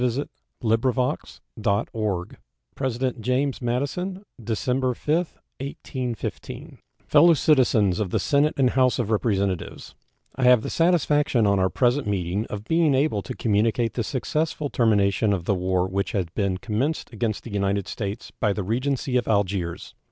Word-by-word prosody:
State 125 +2 +1 0.4
of 115 0 +3
the 115 - -1
Union 100 -5 -1 0.5
Address 130 -1 -1
James 130 +4 0
Madison 145 - -2 0.2
December 125 +3 0
5, 150 +5 0 0.4
1815 130 -3 -6 0.3
Fellow 165 +3 +6
Citizens 120 - +3
of 105 -4 -1
the - - 0
Senate 150 +1 +2
and 130 -3 +3
House 130 -1 +3
of 115 -3 -1
Representatives: 100 -4 -1 0.4
I 130 - 0
have 125 -3 +6
the - - -4
satisfaction 150 -7 +2
on 100 -1 +3
our 95 0 +2
present 125 +2 +1
meeting 100 +1 -1
of 105 0 -6
being 160 +2 +2
able 135 -6 +1
to - - -7
communicate 115 +2 +1
the 120 - -1
successful 150 +3 -2
termination 100 -3 +2
of 90 -4 -3
the 100 - +2
war 90 -1 0
which 95 -1 -2
had 90 -4 -2
been 100 -3 0
commenced 120 +8 -2
against 110 -1 -2
the 115 - -8
United 100 -1 0
States 105 0 -5
by 105 -3 +2
the 105 - -3
Regency 125 +4 0
of 120 - -1
Algiers. 95 -5 -1
115 Hz, 150 wpm, -24 LUFS, 100-130 Hz, 0.5 s, Fellow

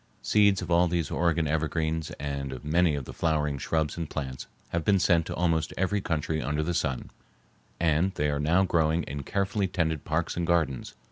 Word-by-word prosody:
Seeds 100 -2 +3
of - - -6
all 85 +1 +5
these 85 -3 -1
Oregon 85 -1 +1
evergreens 80 +1 -1
and 70 -1 -3
of 65 +2 -8
many 80 +1 +3
of 70 -3 -4
the - - -8
flowering 75 -4 0
shrubs 80 +3 -1
and 85 -3 -4
plants 65 -3 -5 0.2
have 85 -1 -1
been 100 +3 +4
sent 85 -3 +3
to - - -4
almost 80 -2 0
every 95 +2 +1
country 80 -2 -1
under 75 +4 -1
the 85 +3 -1
sun, 75 -7 -2 0.7
and 85 +3 +2
they 75 0 +1
are 70 - -1
now 80 +6 +3
growing 80 -2 +2
in 70 +1 -5
carefully 100 +5 -1
tended 80 -5 -1
parks 80 +2 -1
and 85 -1 -2
gardens. 80 -7 0
80 Hz, 195 wpm, -28 LUFS, 75-85 Hz, 0.7 s, all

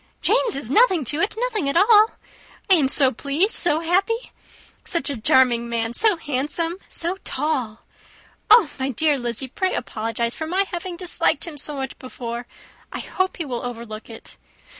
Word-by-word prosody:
Jane's 470 - +2
is 270 -3 -2
nothing 375 - +4
to 295 +6 -2
it 385 - 0
nothing 450 - -1
at 280 - 0
all. 430 +3 +5 0.6
I - - +10
am 305 -7 +4
so 270 -1 +5
pleased 290 - 0
so 325 -3 +2
happy. 395 +8 0 0.5
Such 335 -4 -1
a 245 -6 -6
charming 235 -1 +3
man! 230 0 -2
so 425 - +3
handsome! 300 +4 -2
so 345 +3 -2
tall! 260 -6 -2 0.7
Oh, 450 -9 +7
my 265 +1 -1
dear 290 +2 +1
Lizzy! 240 +2 -2
pray 370 +8 -2
apologize 230 +2 -2
for 315 - -5
my 380 +4 +1
having 350 0 -5
disliked 360 -1 +1
him 335 -3 -8
so 295 +1 +2
much 265 -2 -6
before. 240 -2 -7 0.4
I - - -5
hope 375 0 -2
he 335 - -4
will 245 -3 -5
overlook 230 -3 -7
it. 225 - -12
295 Hz, 170 wpm, -22 LUFS, 245-360 Hz, 0.7 s, I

